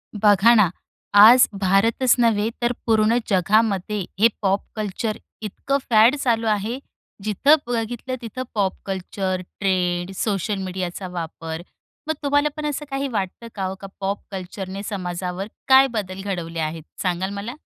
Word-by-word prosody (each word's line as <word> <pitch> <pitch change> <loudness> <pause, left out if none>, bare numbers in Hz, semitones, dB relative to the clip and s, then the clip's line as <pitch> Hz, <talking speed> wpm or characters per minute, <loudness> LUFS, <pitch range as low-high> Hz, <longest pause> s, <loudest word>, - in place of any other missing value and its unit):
बघा 205 +2 +5
ना, 210 -5 +5 0.4
आज 225 +5 +9
भारतच 210 +6 +3
नव्हे 220 -2 +3
तर 240 - +2
पूर्ण 220 0 +3
जगामध्ये 205 +1 +2 0.2
हे 225 - +7
पॉप 195 -1 +1
कल्चर 215 +1 -3 0.2
इतकं 220 +6 -2
फॅड 230 +3 +6
चालू 230 -5 0
आहे, 215 +4 -1 0.4
जिथं 215 +9 +4
बघितलं 240 +2 -3
तिथं 240 +2 -5
पॉप 195 -3 +1
कल्चर, 190 -1 -3 0.2
ट्रेंड, 180 -2 0
सोशल 205 0 -1
मीडियाचा 185 0 -4
वापर. 165 -2 -6 0.5
मग 315 - +1
तुम्हाला 290 +1 +2
पण 305 - -4
असं 295 0 -3
काही 275 +1 -1
वाटतं 215 -1 -4
का 190 -2 -2
ओ, 190 - -5
का 195 - -8
पॉप 200 +1 -2
कल्चरने 190 +1 -6
समाजावर 180 -1 -4 0.2
काय 265 0 +7
बदल 195 -3 -4
घडवले 170 -4 -4
आहेत, 160 0 -3 0.2
सांगाल 185 +1 -1
मला? 205 +4 -5
205 Hz, 145 wpm, -22 LUFS, 185-230 Hz, 0.5 s, आज